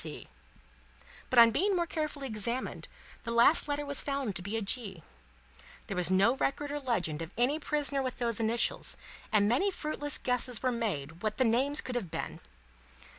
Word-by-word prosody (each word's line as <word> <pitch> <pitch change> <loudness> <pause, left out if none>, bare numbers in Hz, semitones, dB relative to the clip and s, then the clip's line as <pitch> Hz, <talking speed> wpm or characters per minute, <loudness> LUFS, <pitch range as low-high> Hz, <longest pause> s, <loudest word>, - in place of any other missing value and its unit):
C.; - - -8 1.0
but, 255 - -1
on 230 -1 +9
being 395 - +1
more 345 -1 +1
carefully 305 -4 -4
examined, 235 +2 -2 0.3
the 230 - -7
last 235 +8 +5
letter 290 0 -2
was 285 -1 +2
found 275 -8 -3
to - - +1
be 205 +5 -3
G. 200 -5 -1 0.8
There 195 - -5
was 180 -2 +1
no 195 +7 +4
record 285 +2 -1
or 295 - -3
legend 180 - -2
of 165 - -5
any 265 +6 +2
prisoner 290 -2 0
with 255 -1 -4
those 235 -2 -2
initials, 230 +1 0 0.3
and 205 -2 +4
many 260 - +2
fruitless 300 -5 0
guesses 250 -1 +1
were 255 - +2
made 175 - -3
what 215 -1 -2
the 260 - +3
name 255 +5 +1
could 255 - +1
have 240 -8 -3
been. - - -5
245 Hz, 175 wpm, -30 LUFS, 215-285 Hz, 1.0 s, on